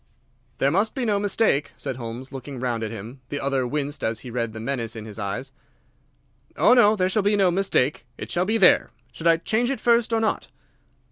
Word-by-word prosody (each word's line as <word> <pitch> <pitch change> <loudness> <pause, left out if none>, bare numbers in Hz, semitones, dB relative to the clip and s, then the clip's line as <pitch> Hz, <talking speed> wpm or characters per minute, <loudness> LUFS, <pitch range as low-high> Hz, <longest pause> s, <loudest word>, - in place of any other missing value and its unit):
"There 140 - +2
must 200 +6 +1
be 260 -3 -1
no 205 -2 +1
mistake," 205 -7 +1
said 135 -3 -4
Holmes, 120 +2 -7
looking 135 -1 -7
round 120 -2 -2
at 110 - -2
him. 115 +5 -9
The 145 - -3
other 135 -2 0
winced 145 +1 -3
as 110 0 -1
he 125 - -8
read 115 -2 -2
the 110 - -8
menace 115 -2 -3
in 110 -1 -7
his 110 -1 -9
eyes. 100 +7 -4 1.1
"Oh - - +6
no, 220 -4 +6
there 185 -3 +1
shall 200 +3 +1
be 205 +1 +2
no 195 -3 +3
mistake. 175 -7 0
It - - -7
shall 180 +1 +1
be 220 +3 +1
there. 190 -4 +5 0.2
Should 160 +8 -3
I 165 -1 +5
change 225 +8 0
it 275 - -2
first 235 -1 +2
or 225 - +2
not?" 220 -1 -1
145 Hz, 215 wpm, -24 LUFS, 120-205 Hz, 1.1 s, Oh